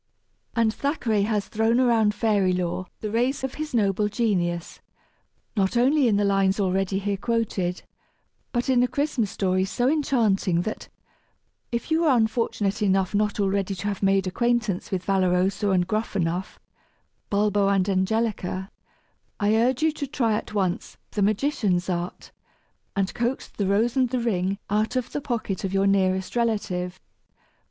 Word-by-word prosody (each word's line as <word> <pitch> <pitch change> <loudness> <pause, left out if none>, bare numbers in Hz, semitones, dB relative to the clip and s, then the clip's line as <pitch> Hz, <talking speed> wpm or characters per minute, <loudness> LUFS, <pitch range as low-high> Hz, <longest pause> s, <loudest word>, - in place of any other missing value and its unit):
And 230 -2 +2
Thackeray 240 -8 0
has 210 -3 0
thrown 225 +2 +1
around 225 -4 +3
fairy 205 -4 +2
lore 180 0 -2
the 215 - -3
rays 245 +5 0
of 265 - -2
his 305 -4 -4
noble 210 -1 +2
genius, 180 -6 -1 0.8
not 195 +2 +1
only 270 +3 +4
in 215 - +3
the 205 - +2
lines 195 0 +2
already 195 0 0
here 200 0 -1
quoted, 195 -5 -1 0.7
but 240 +1 -1
in 255 -2 +4
a 250 - +3
Christmas 255 -4 -1
story 185 -2 0
so 245 +6 0
enchanting 225 - +2
that, 215 - -5 0.8
if 235 +6 -3
you 325 +1 +3
are 285 -6 +4
unfortunate 220 -3 0
enough 195 -2 +2
not 210 0 0
already 195 -1 0
to 200 - -4
have 200 - -4
made 195 -1 +3
acquaintance 225 -1 0
with 185 -2 -3
Valoroso 190 +1 +1
and 185 -2 +2
Gruffanuff, 190 -4 -2 0.7
Bulbo 205 -1 +2
and 195 -1 +2
Angelica, 195 -1 -1 0.7
I 210 +1 +2
urge 250 +5 +2
you 320 - +4
to 295 -2 -5
try 240 -5 0
at 210 - -3
once 190 -1 -1
the 210 - -2
magician's 200 -4 +1
art 175 0 -4 0.6
and 195 -1 0
coax 240 +2 -2
"The 200 - -2
Rose 220 +4 +2
and 255 -2 +2
the 255 - -1
Ring" 200 -5 0
out 215 +4 0
of 255 -2 -2
the 290 - -3
pocket 230 -8 -3
of 195 0 -2
your 195 0 +3
nearest 190 0 +1
relative. 205 -6 -1
205 Hz, 155 wpm, -25 LUFS, 190-235 Hz, 0.8 s, only